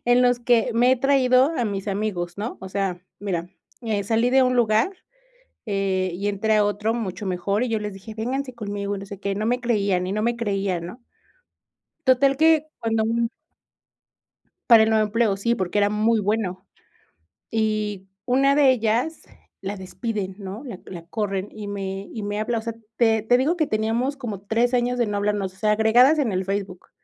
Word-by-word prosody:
en 245 +1 +4
los 245 -1 +3
que 235 -2 +3
me 245 +2 +4
he - - +2
traído 265 +1 +3
a 245 - 0
mis 200 -1 -3
amigos, 195 -3 -3
¿no? 215 +4 -4
O 190 - -7
sea, 190 -2 -2 0.2
mira, 180 -4 -3 0.3
eh, 215 -3 -1
salí 230 +4 +2
de 265 +1 +5
un 255 -1 +2
lugar, 225 - +3 0.8
eh, 190 -2 0
y 195 +4 -3
entré 205 +2 +1
a 210 -1 +4
otro 210 +2 0
mucho 205 -4 -4
mejor, 195 +4 0
y 250 - -2
yo 225 -1 0
les 210 -1 -5
dije: 195 +3 -10
"Vénganse 255 +4 -3
conmigo, 205 -3 -4
no 195 - -7
sé 200 -1 -9
qué", 200 0 -2
no 210 +2 -2
me 245 +2 +1
creían, 200 -6 +1
y - - -3
no 210 +2 -1
me 235 +2 +1
creían, 195 -6 -2
¿no? 205 +9 -10 1.0
Total 270 +1 +4
que 315 -1 +4
cuando 225 -1 0
un 230 +1 0 1.4
Para 230 -2 +9
el 220 - +2
nuevo 220 -1 +3
empleo, 210 -2 +1
sí, 235 +4 +1
porque, 190 -2 -2
era 205 0 +3
muy 215 +2 +2
bueno, 200 -3 -2 0.9
y 215 -3 -1 0.2
una 270 +2 +3
de 285 -2 +5
ellas 245 +6 0 0.4
la 200 +1 -4
despiden, 195 0 -4
¿no?, 200 +3 -7
la 230 -8 -7
la 170 -3 -8
corren 195 +1 -3
y 215 -1 -8
me 195 -1 -5
y 220 - -5
me 205 0 -3
habla, 225 +2 -1
o - - -6
sea, 230 0 -4 0.2
te 225 -2 +3
te 245 +3 +4
digo 285 +8 +1
que 315 -3 +1
teníamos 225 +5 -1
como 220 -8 -5
3 230 +4 +1
años 245 0 +1
de 240 - +2
no 205 -1 -2
hablarnos, 200 -2 -1
o - - -22
sea, 210 +2 +1
agregadas 240 +8 +5
en 250 - +1
el 185 0 -1
Facebook 195 -2 -4
215 Hz, 200 wpm, -23 LUFS, 200-240 Hz, 1.4 s, Para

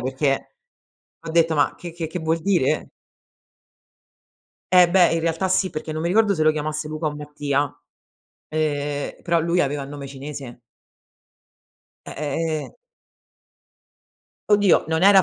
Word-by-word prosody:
perché 135 +2 -1 0.7
ho 165 - -9
detto: 165 0 +3
"Ma 145 - +2
che 175 - -8
che 165 -2 -4
che 170 - -5
vuol 160 0 0
dire?" 175 -6 +1 1.9
Eh 180 -1 +8
beh, 175 -1 +5
in 165 - +1
realtà 165 +3 0
sì, 185 +1 +2
perché 155 -2 -5
non 155 - -3
mi 170 - -1
ricordo 205 +2 +3
se 155 - 0
lo 155 - +5
chiamasse 155 0 -3
Luca 155 +1 -5
o 150 -1 0
Mattia, 145 -1 -2 0.8
ehm, 145 -2 -2
però 170 -1 +2
lui 170 +2 +2
aveva 145 0 -2
il 135 - -10
nome 145 -1 -7
cinese. 135 -2 -8 1.5
Eh, - - -7
ehm 150 +3 -2 0.2
ehm. - - -12 1.8
Oddio, 205 -3 +5
non 160 +2 +1
era 195 -1 +8
155 Hz, 145 wpm, -23 LUFS, 145-170 Hz, 1.9 s, Eh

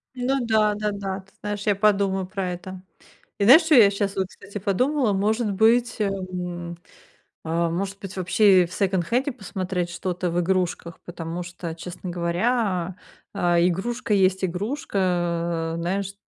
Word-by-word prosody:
Ну 255 0 0
да, 215 -2 +3
да-да, 200 -2 -3
ты 195 +1 -27
знаешь, 205 -1 -4
я 205 - +3
подумаю 195 -2 +2
про 190 -2 -3
это. 180 +1 -8 0.6
И - - 0
знаешь, 270 - +8
чё 320 -2 +4
я 210 -5 +7
щас 200 0 -2
вот, 190 - 0
кстати, 200 +2 -10
подумала, 230 +4 +1
может 215 +3 0
быть, 235 +4 +3
эм, 180 -3 -3 0.7
а, 165 +1 0
может 195 +3 -3
быть, 195 -2 -8
вообще 185 0 +4
в 170 - -13
секонд-хенде 200 - 0
посмотреть 185 -6 -4
что-то 180 0 -3
в 175 - +1
игрушках, 175 -2 -1
потому 170 0 -5
что, 170 -2 -7
честно 180 +1 -7
говоря, 180 +1 0 0.4
а, 175 -3 +2
игрушка 210 +6 0
есть 190 -1 +2
игрушка. 200 +7 -3
А, 170 -3 0
знаешь, 190 +3 -2
190 Hz, 145 wpm, -24 LUFS, 175-210 Hz, 0.7 s, знаешь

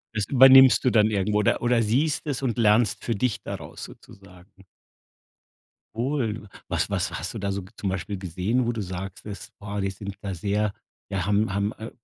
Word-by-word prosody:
Das 105 -3 -1
übernimmst 130 -1 +7
du 125 - +4
dann 110 -1 +4
irgendwo 105 +1 +1
oder 105 - +1
oder 120 -1 +2
siehst 135 +8 0
es 140 -4 -2
und 125 -3 -1
lernst 110 0 +3
für 115 - -1
dich 110 +1 -1
daraus 90 -7 -7
sozusagen. 95 0 -15 1.3
Wohl. 115 -4 -2 0.2
Was - - -1
was - - -1
hast 85 - -5
du 110 - -6
da 100 0 -2
so 100 - -4
zum 100 - -2
Beispiel 95 +1 -4
gesehen, 95 +7 -1
wo 120 - 0
du 110 - -4
sagst 95 0 -7
das: 100 -3 -8
„Boah, 100 0 -5
die 95 - -1
sind 100 +1 -8
da 100 -2 -4
sehr 100 +3 -1 0.4
ja, 95 -3 -2
haben 100 -1 +1
haben, 100 +1 0
äh, 110 +1 -7
105 Hz, 190 wpm, -25 LUFS, 95-115 Hz, 1.3 s, übernimmst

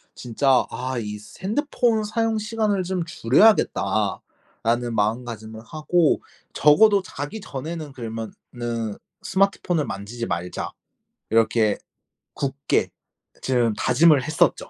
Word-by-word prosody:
진짜 130 +2 +2
'아. 130 0 -3
이 105 -2 -5
스 105 - -15
핸드폰 235 -1 +1
사용 220 +1 0
시간을 210 -2 0
좀 180 -1 -2
줄여야겠다.'라는 115 - +1
마음가짐을 110 0 -2
하고 155 +4 +1 0.3
'적어도 200 +7 +5
자기 145 +4 -6
전에는 155 0 -6
그러면은 115 -1 -5 0.3
스마트폰을 190 -5 +1
만지지 115 +4 -5
말자.' 85 -1 -4 0.6
이렇게 110 -1 +3 0.6
굳게 140 0 0 0.5
좀 120 -4 +1
다짐을 140 +3 +4
했었죠. 160 +3 +1
130 Hz, 255 characters per minute, -23 LUFS, 115-180 Hz, 0.6 s, 적어도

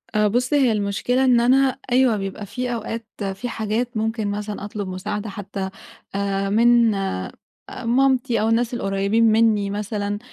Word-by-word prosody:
أ 210 0 +4
بُص 245 +5 0
هي 270 -5 +4
المشكلة 215 +5 0
إن 250 -2 +5
أنا، 260 +2 +3
أيوه 250 -3 +4
بيبقى 195 +1 -5
في 245 +4 -3
أوقات، 230 0 -4 0.3
في 245 +6 -5
حاجات 225 +2 -2
ممكن 220 0 -1
مثلًا 205 0 -4
أطلُب 205 -1 -5
مساعَدة 205 +3 -4
حتى 195 -1 -5 0.5
آآ، 195 0 -1
من 230 +1 +4
أ 190 - -3 0.4
مامتي 250 0 +1
أو 220 - +1
الناس 235 +1 +1
القريّبين 200 0 +1
مِنّي 215 -2 +3
مثلًا. 205 0 -3
215 Hz, 150 wpm, -22 LUFS, 200-240 Hz, 0.5 s, إن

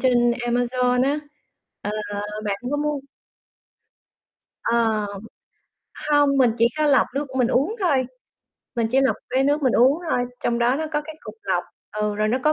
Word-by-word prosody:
trên 240 -2 +3
Amazon 245 +1 +1
á. 285 +2 +1 0.6
Ờ, 205 - -2 0.5
bạn 200 -1 -1
có 290 - 0
mua 295 -1 -1 1.6
Ờ. 225 -3 +1 1.1
Hông, 290 -1 +4
mình 255 -3 +5
chỉ 230 - +5
có 305 - +3
lọc 280 -2 +4
nước 285 +2 -1
mình 250 -2 +3
uống 305 - +1
thôi, 275 -9 +2 0.7
mình 235 -2 +1
chỉ 265 +2 +3
lọc 270 - +2
cái 265 +1 +2
nước 290 +1 +1
mình 255 - +3
uống 265 +6 +4
thôi, 245 - +1 0.2
trong 235 0 0
đó 240 +3 +2
nó 315 - -2
có 295 - +1
cái 310 +1 -9
cục - - -9
lọc, - - 0 0.3
ừ, 210 0 -1
rồi 215 +1 +1
nó 245 +4 +1
có 305 - +4
255 Hz, 175 wpm, -23 LUFS, 235-290 Hz, 1.6 s, mình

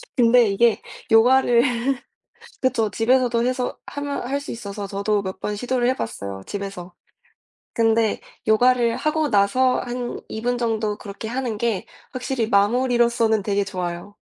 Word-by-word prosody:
근데 240 -1 +5
이게 225 +3 +2 0.3
요가를 240 +1 +5 1.0
그렇죠 225 -5 +1
집에서도 240 0 +2
해서 255 0 -2
하면 285 0 -4
할 280 +2 -1
수 285 - -8
있어서 200 -3 -6
저도 200 +1 -1
몇 190 -1 -6
번 210 0 -3
시도를 245 +2 0
해 260 - +1
봤어요 100 -4 -5
집에서. 195 -3 -6 0.8
근데 225 -1 +2 0.3
요가를 240 +1 +3
하고 305 -1 0
나서 240 +6 +3
한 245 0 -5
2 240 +2 -2
정도 220 -3 -1
그렇게 205 +2 -8
하는 245 -3 -3
게 225 -5 -1 0.3
확실히 250 -3 -2
마무리로서는 235 0 +2
되게 200 0 0
좋아요. 180 -1 -5
230 Hz, 290 characters per minute, -22 LUFS, 205-250 Hz, 1.0 s, 근데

